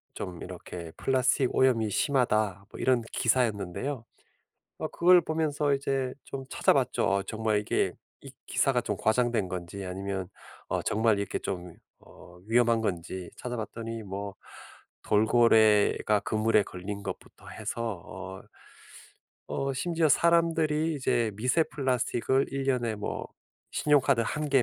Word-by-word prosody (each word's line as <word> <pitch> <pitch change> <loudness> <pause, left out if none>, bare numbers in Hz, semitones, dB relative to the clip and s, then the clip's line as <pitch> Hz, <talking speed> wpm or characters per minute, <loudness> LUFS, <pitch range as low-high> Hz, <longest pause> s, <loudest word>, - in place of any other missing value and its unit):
좀 90 -2 -6
이렇게 85 -2 -8
'플라스틱 130 0 +1
오염이 120 -5 +3
심하다.' 110 - +1
뭐 - - -10
이런 125 -2 +3
기사였는데요. 115 +2 0 0.8
어 - - -3
그걸 180 +1 +5
보면서 155 -3 0
이제 135 -2 -1
좀 135 -1 -6
찾아봤죠. - - +2
어 100 0 +2
정말 110 0 0
이게 105 - 0 0.3
이 - - -10 0.2
기사가 - - +1
좀 - - -2
과장된 110 -2 +1
건지 90 +2 -6
아니면 95 0 -4 0.4
어 - - 0
정말 110 -1 +2
이렇게 100 - -2
좀 90 -2 -5 0.3
어 90 0 -16
위험한 115 0 +3
건지 90 -3 -3
찾아봤더니 115 -1 -5
뭐 100 0 -5 0.7
돌고래가 110 -1 +4
그물에 110 0 +2
걸린 100 +3 -6
것부터 - - -8
해서 115 -7 -4
어 95 +1 -8 1.1
어 135 0 -2
심지어 165 +3 +1
사람들이 165 0 +3
이제 120 -5 0
미세 125 +9 +2
플라스틱을 130 -1 0
1 135 0 -2
년에 125 -4 0
뭐 105 - -4 0.5
'신용카드 140 -4 +3
1 150 +6 -2
개 135 -2 +5
115 Hz, 275 characters per minute, -28 LUFS, 100-135 Hz, 1.1 s, 그걸